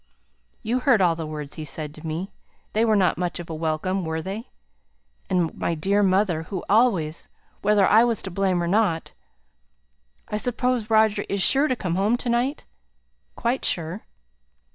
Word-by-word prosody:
"You 240 +3 0
heard 250 -4 +4
all 175 -3 +3
the 160 -1 -5
words 150 -2 -6
he 155 - -6
said 150 0 -4
to 155 +1 -9
me; 165 +5 -4 0.4
they 220 - +2
were 220 -2 +3
not 190 -3 +2
much 180 0 -2
of 170 -1 -7
a - - -3
welcome, 160 +4 -1
were 160 0 -2
they? 195 +8 -6 0.8
And 180 -4 0
my 170 - -1
dear 195 +6 +1
mother, 190 -4 +2
who 180 +2 -6
always 195 -8 +1 0.3
whether 205 -1 +4
I 220 +2 +6
was 235 -3 0
to 190 - -6
blame 185 -1 0
or - - -1
not 185 -4 +1 1.1
I 210 - -2
suppose 245 0 -1
Roger 220 -1 +3
is 200 -2 +1
sure 280 +8 +4
to 255 - 0
come 180 -7 -3
home 210 +5 +2
to 245 - -4
night?" 245 +5 0 0.7
"Quite 240 +2 -1
sure." 170 +4 -1
195 Hz, 175 wpm, -24 LUFS, 165-220 Hz, 1.1 s, I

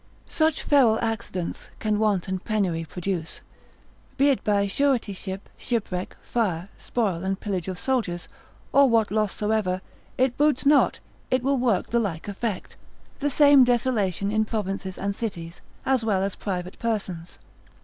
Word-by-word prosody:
Such 315 -1 +1
feral 255 -7 +5
accidents 225 -6 -3
can 210 -1 0
want 210 -5 +1
and 190 -1 -3
penury 185 -7 0
produce. 175 0 -4 0.8
Be 280 +1 +5
it 270 - +1
by 205 -1 +2
suretyship, 200 -5 -1
shipwreck, 195 -6 -3
fire, 190 -6 -1
spoil 195 -8 -1
and 190 0 -1
pillage 190 -5 -3
of 185 -1 -4
soldiers, 180 -9 -1 0.5
or 275 0 +6
what 225 -3 +3
loss 215 -1 +1
soever, 210 -4 0 0.4
it 255 -1 +2
boots 295 -2 +2
not, 285 0 +4 0.3
it 255 -1 +1
will 275 0 +2
work 230 -7 +1
the 235 - +3
like 190 -7 -3
effect, 205 -1 -4 0.4
the 290 - +1
same 285 -1 +7
desolation 220 -6 +1
in 220 0 +2
provinces 195 -3 -3
and 200 0 -2
cities, 175 -7 -5 0.2
as 260 -3 +2
well 200 -4 +1
as 195 0 -1
private 180 -2 -4
persons. 190 -7 -3
210 Hz, 150 wpm, -25 LUFS, 190-240 Hz, 0.8 s, same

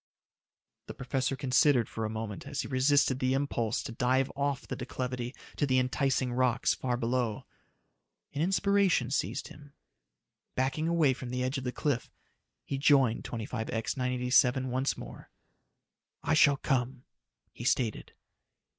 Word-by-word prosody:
The - - -7
professor 135 +1 -1
considered 130 -1 +3
for 110 - -4
a - - -2
moment 110 +2 -5
as 140 -1 -2
he - - -6
resisted 130 0 +3
the 130 0 +1
impulse 120 -5 -1
to 140 - -6
dive 130 +3 +1
off 140 -1 -1
the - - -4
declivity 125 0 -4 0.2
to 145 - +1
the 130 -1 +2
enticing 130 0 +1
rocks 125 -1 +2
far 125 -2 -2
below. 120 -2 -1 0.9
An 145 - -2
inspiration 195 -7 +2
seized - - -2
him. 145 -1 -14 0.8
Backing 135 +5 0
away 165 -5 +3
from 125 0 -7
the 125 +1 -2
edge 130 +2 -1
of 130 - -8
the 125 - -1
cliff, 140 -2 -1 0.5
he 135 - -4
joined 135 -5 +4
25X 115 -1 -3
987 125 0 +2
once 130 +2 0
more. - - -10 0.9
"I - - +1
shall 140 -1 +5
come," 130 -2 -1 0.5
he - - -9
stated. 120 -3 0
130 Hz, 145 wpm, -30 LUFS, 125-140 Hz, 0.9 s, shall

